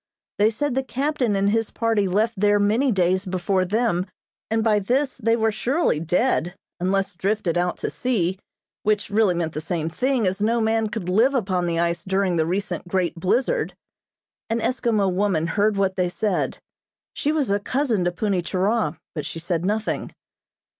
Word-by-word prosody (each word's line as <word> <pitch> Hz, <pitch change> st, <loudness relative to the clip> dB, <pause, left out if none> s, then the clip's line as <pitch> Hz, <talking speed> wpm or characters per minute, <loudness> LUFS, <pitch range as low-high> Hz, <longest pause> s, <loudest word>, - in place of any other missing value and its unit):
They 210 Hz, +1 st, +5 dB
said 290 Hz, +5 st, -1 dB
the 265 Hz, -, +1 dB
captain 265 Hz, -3 st, -1 dB
and 200 Hz, +1 st, +2 dB
his 225 Hz, 0 st, +1 dB
party 225 Hz, -3 st, +1 dB
left 215 Hz, +5 st, +1 dB
there 205 Hz, +1 st, +3 dB
many 220 Hz, +7 st, +2 dB
days 185 Hz, -1 st, +2 dB
before 185 Hz, 0 st, 0 dB
them, 205 Hz, -2 st, 0 dB, 0.4 s
and 225 Hz, 0 st, +1 dB
by 215 Hz, -2 st, +3 dB
this 260 Hz, +7 st, 0 dB
they 230 Hz, -1 st, +2 dB
were 225 Hz, -1 st, +1 dB
surely 245 Hz, -, 0 dB
dead, 175 Hz, +1 st, +1 dB, 0.2 s
unless 195 Hz, +2 st, 0 dB
drifted 195 Hz, -1 st, -1 dB
out 175 Hz, 0 st, 0 dB
to -, -, -3 dB
sea, 190 Hz, -7 st, -1 dB, 0.4 s
which 210 Hz, -1 st, 0 dB
really 205 Hz, -3 st, +3 dB
meant 165 Hz, -2 st, -2 dB
the 155 Hz, -, -3 dB
same 160 Hz, 0 st, -2 dB
thing, 250 Hz, +5 st, 0 dB
as 190 Hz, +2 st, -1 dB
no 230 Hz, +3 st, +2 dB
man 220 Hz, -1 st, +1 dB
could 210 Hz, -4 st, -5 dB
live 230 Hz, +9 st, +3 dB
upon 185 Hz, -7 st, 0 dB
the 165 Hz, -1 st, -1 dB
ice 170 Hz, 0 st, 0 dB
during 190 Hz, -1 st, 0 dB
the 160 Hz, -1 st, +1 dB
recent 180 Hz, -1 st, -2 dB
great 180 Hz, -1 st, 0 dB
blizzard. 235 Hz, -, 0 dB, 0.7 s
An 225 Hz, -, 0 dB
Eskimo 230 Hz, -5 st, +1 dB
woman 185 Hz, -4 st, +1 dB
heard 205 Hz, +4 st, +1 dB
what 195 Hz, -1 st, 0 dB
they 180 Hz, -1 st, +1 dB
said. 200 Hz, +1 st, -1 dB, 0.6 s
She 295 Hz, -, 0 dB
was 295 Hz, -8 st, 0 dB
a 200 Hz, -, +2 dB
cousin 240 Hz, -3 st, 0 dB
to 175 Hz, -, +2 dB
Punni 190 Hz, +1 st, 0 dB
Churah, 190 Hz, -1 st, 0 dB, 0.2 s
but 150 Hz, -, -4 dB
she -, -, -6 dB
said 170 Hz, 0 st, -2 dB
nothing. 210 Hz, +3 st, -1 dB
205 Hz, 180 wpm, -23 LUFS, 180-225 Hz, 0.7 s, They